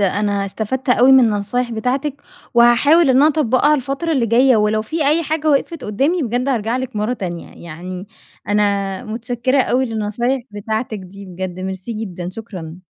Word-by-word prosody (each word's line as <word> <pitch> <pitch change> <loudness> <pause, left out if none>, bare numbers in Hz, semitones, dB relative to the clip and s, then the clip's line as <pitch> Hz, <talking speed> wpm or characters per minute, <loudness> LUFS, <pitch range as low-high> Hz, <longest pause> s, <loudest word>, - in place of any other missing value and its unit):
أنا 200 0 0
استفدت 235 +6 -4
أوي 250 +2 +5
من 265 - +8
النصايح 225 +3 -1
بتاعتِك، 265 +6 -2 0.3
وهاحاول 260 +6 +5
إن 255 - +3
أنا 285 - +6
أطبّقها 295 0 +2
الفترة 275 +5 -2
اللي 255 -5 +1
جاية، 245 +2 +4
ولو 215 0 +1
في 305 +5 -2
أي 325 +3 +2
حاجة 310 0 0
وقفِت 295 +2 0
قدّامي 280 - 0
بجد 245 +3 -1
هارجع 230 -2 0
لِك 260 -3 -5
مرة 210 +4 0
تانية. 175 -7 -6
يعني 180 +4 -7 0.4
أنا 200 -2 0
مُتشكرة 245 +4 0
أوي 260 +2 +1
للنصايح 230 +4 -2
بتاعتِك 220 +2 -4
دي 195 +2 -11
بجد، 185 0 -6
ميرسي 190 +4 -5
جدًا، 185 -5 -5
شكرًا. 185 -7 -8
230 Hz, 165 wpm, -18 LUFS, 200-265 Hz, 0.4 s, من